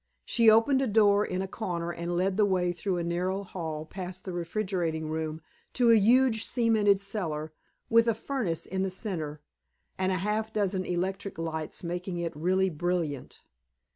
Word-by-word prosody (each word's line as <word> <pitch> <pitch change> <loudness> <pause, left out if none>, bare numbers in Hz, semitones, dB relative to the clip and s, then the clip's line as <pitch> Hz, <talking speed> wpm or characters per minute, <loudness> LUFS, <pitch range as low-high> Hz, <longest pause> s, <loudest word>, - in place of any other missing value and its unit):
She 230 -2 +5
opened 230 +5 +5
a 270 - +1
door 205 -1 +4
in 185 -1 -2
a - - -4
corner 175 -4 -3
and 170 +1 -3
led 185 +1 +1
the 210 - +3
way 185 -3 +2
through 180 +2 -2
a 170 - -1
narrow 180 +3 -1
hall 160 -5 -5
past 185 +1 -7
the 185 - -4
refrigerating 170 -3 -2
room, 160 0 -3 0.3
to 240 -2 +4
a - - +8
huge, 225 +1 +4
cemented 220 -5 +3
cellar, 160 -7 -3 0.3
with 230 0 +4
a 230 - +3
furnace 225 - -3
in 190 +1 -3
the 190 - 0
center, 165 -6 -4 0.6
and 190 0 +1
a - - +1
half 210 +4 -1
dozen 195 -3 0
electric 190 +2 -3
lights 160 -1 -4
making 175 +1 -4
it 170 -2 -3
really 185 +4 +1
brilliant. 165 -3 -3
185 Hz, 170 wpm, -28 LUFS, 170-210 Hz, 0.6 s, a